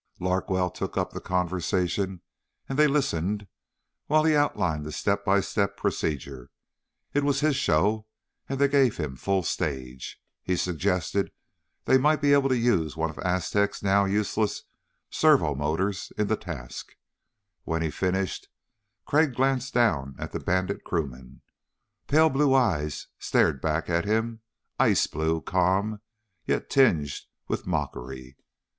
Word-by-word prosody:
Larkwell 90 0 0
took - - -5
up - - 0
the - - -6
conversation 90 +1 -1 0.5
and 135 +1 -3
they 150 - +7
listened 105 - 0 0.6
while 155 +1 +4
he 160 0 +4
outlined 90 - +1
the 75 - -6
step 100 +5 -1
by 100 -1 +3
step 100 0 -1
procedure. 70 -4 -3 0.6
It 145 - +2
was 140 0 +1
his 155 -2 +2
show 105 - +1 0.4
and 135 - -2
they 140 +1 +4
gave 135 -4 +3
him 75 -5 -3
full 95 +6 0
stage. 65 -5 -4 0.2
He 90 - -1
suggested 90 +2 -1 0.5
they 130 - +5
might 150 +3 +3
be 145 -1 +4
able 140 -1 +4
to 130 - +2
use 90 -11 +1
one 80 0 -1
of 75 - -14
Aztec's 95 +3 0
now 100 0 +3
useless 105 +1 0 0.5
servo 75 - +4
motors 80 +7 -2
in 105 - +1
the 110 - +1
task. 70 - -8 0.7
When 80 0 -1
he 80 - -1
finished, 95 +1 -2 0.6
Crag 150 -3 +2
glanced 135 0 0
down 70 - +2
at - - -6
the - - -3
Bandit 95 +2 -1
crewman. 65 -6 -5 0.6
Pale 160 +2 +4
blue 135 0 +3
eyes 80 - +1
stared 65 - +2
back 80 +1 -1
at 85 +2 0
him. 110 +2 -1 0.4
Ice - - +4
blue, 80 +1 -1
calm, 95 +6 0 0.5
yet - - -1
tinged 85 - +4 0.4
with - - -3
mockery. 65 -5 -4
95 Hz, 140 wpm, -26 LUFS, 80-120 Hz, 0.7 s, they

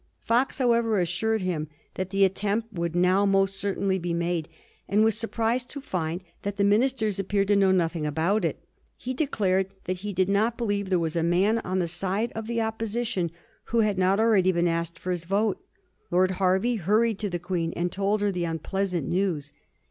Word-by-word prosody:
Fox, 245 +4 +1
however, 235 -5 +2
assured 185 +5 0
him 165 -4 -2 0.3
that 185 0 -4
the 195 0 +4
attempt 210 +4 -1
would 170 -2 -2
now 180 +3 +3
most 195 -1 +2
certainly 195 -1 0
be 170 -1 -2
made, 170 -2 -1 0.4
and 210 +2 +4
was 220 -1 +3
surprised 230 +2 -1
to 285 - -6
find 175 - -3 0.2
that 200 0 -4
the 200 - +2
ministers 215 0 +2
appeared 195 0 0
to 205 - +4
know 195 -1 +4
nothing 170 -3 +1
about 165 +8 +1
it. 165 -4 -2 0.3
He 255 - -4
declared 200 -10 +1 0.2
that 185 0 -3
he 205 +3 -5
did 185 -1 +1
not 215 +4 +1
believe 205 -4 -1
there 185 - +3
was 165 -1 -2
a 165 - +1
man 185 +7 +2
on 185 -3 -3
the 175 -2 +1
side 195 +7 -1
of 225 0 -6
the 230 0 -1
Opposition 220 -4 -2 0.4
who 230 -1 +1
had 210 -3 +1
not 190 +2 +3
already 210 -5 +4
been 175 -1 +1
asked 170 0 -2
for 185 - -4
his 175 -2 -3
vote. 200 +3 0 0.5
Lord 185 +1 +3
Hervey 190 +5 +1
hurried 210 +3 +2
to 210 - -2
the 175 - -2
Queen 175 -1 -2
and 175 +1 -1
told 200 +2 0
her 205 -1 +2
the 175 -2 -2
un 165 0 -2
pleasant 180 -2 -2
news. 170 -6 -1
195 Hz, 200 wpm, -26 LUFS, 175-215 Hz, 0.5 s, the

